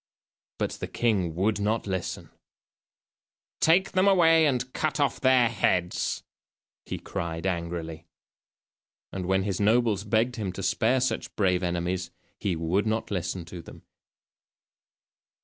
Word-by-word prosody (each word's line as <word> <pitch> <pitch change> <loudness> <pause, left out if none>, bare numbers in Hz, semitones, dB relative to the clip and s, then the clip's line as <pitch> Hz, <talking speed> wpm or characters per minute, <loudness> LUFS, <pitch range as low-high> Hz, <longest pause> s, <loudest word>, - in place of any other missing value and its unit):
But - - -1
the - - -4
king 95 -9 0
would 105 +4 +1
not 110 +2 0
listen. 95 -3 -4 1.3
"Take 175 +4 +4
them 185 +1 +3
away 165 -4 +5
and 130 -2 -1
cut 155 -1 -1
off 140 -4 0
their 130 -2 +5
heads," 90 -5 0 0.6
he - - -3
cried 85 +1 -5
angrily. 85 -2 -3 1.0
And 95 -2 -4
when 95 0 +2
his 100 -2 -2
nobles 110 -1 +2
begged 115 +4 +1
him 100 -4 -2
to 95 - -6
spare 125 +6 +2
such 130 - -2
brave 90 -3 +2
enemies 90 0 -2 0.3
he 95 -4 -1
would 85 +6 0
not 110 0 -1
listen 90 -2 -3
to 85 +1 -8
them. 80 - -13
100 Hz, 130 wpm, -27 LUFS, 90-120 Hz, 1.3 s, away